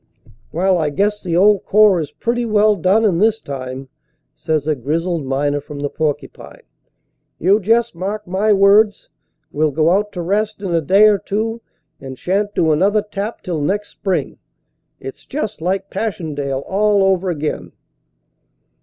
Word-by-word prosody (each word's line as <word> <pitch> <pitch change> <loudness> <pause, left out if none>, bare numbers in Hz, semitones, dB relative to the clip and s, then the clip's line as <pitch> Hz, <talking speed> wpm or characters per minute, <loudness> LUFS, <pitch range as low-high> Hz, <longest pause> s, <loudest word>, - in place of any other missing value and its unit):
"Well, 185 +2 +1
I 155 -2 0
guess 205 +7 -1
the 170 -2 -1
old 205 +1 +4
Corps 210 -3 +4
is 150 - -5
pretty 240 +1 -2
well 215 -2 +3
done 195 +5 +2
in 180 -5 +2
this 220 +2 +2
time," 135 -3 -7 0.5
says 155 -3 -2
a 155 - +1
grizzled 160 +3 -2
miner 145 +2 -1
from 145 0 -10
the 145 - -3
Porcupine. 155 -2 -4 0.7
"You 195 +5 +3
just 230 +3 +1
mark 200 +5 -4
my 195 +4 0
words; 205 +1 +3 0.4
we 150 - -1
ll 155 - +3
go 155 +3 +1
out 205 +2 +1
to 175 - -4
rest 210 +4 -1
in 185 -3 -2
a 165 - +2
day 195 +8 +5
or 205 -2 +3
two 225 +4 -3 0.4
and 130 -1 -9
shan 195 +7 0
t - - -25
do 160 - +2
another 200 +7 +2
tap 205 +2 -6
till 170 -4 -3
next 205 +7 -1
spring. 190 -3 -3 0.6
It - - -7
s - - -26
just 215 - -5
like 190 +3 -2
Passchendaele 145 -10 -3
all 205 0 +2
over 190 -1 +1
again." 155 -3 -4
190 Hz, 170 wpm, -18 LUFS, 155-210 Hz, 0.7 s, day